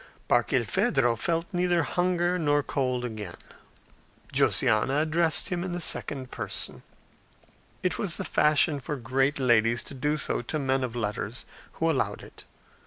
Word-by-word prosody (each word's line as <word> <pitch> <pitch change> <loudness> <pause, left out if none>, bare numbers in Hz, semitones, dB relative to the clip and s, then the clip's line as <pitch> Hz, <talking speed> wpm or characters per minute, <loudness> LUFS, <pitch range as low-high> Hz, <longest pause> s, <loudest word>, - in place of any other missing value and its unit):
Barkilphedro 120 -3 +2
felt 165 +8 -1
neither 175 -1 +2
hunger 180 +1 0
nor 145 -2 +2
cold 130 -4 -1
again. 105 -7 -6 1.0
Josiana 130 +7 +3
addressed 160 0 +1
him 175 -1 -2
in 185 -1 -4
the 175 - -2
second 135 -5 -2
person; 105 -4 -5 1.0
it 180 -2 0
was 195 -6 0
the - - -3
fashion 150 0 +3
for 150 +2 -4
great 135 +2 0
ladies 120 -3 +3
to - - -7
do 150 +3 -1
so - - 0
to 120 +6 -3
men 135 -2 0
of 120 -2 -4
letters, 110 +1 -3 0.3
who 165 - -1
allowed 155 -5 0
it. - - -14
140 Hz, 145 wpm, -27 LUFS, 120-165 Hz, 1.0 s, Josiana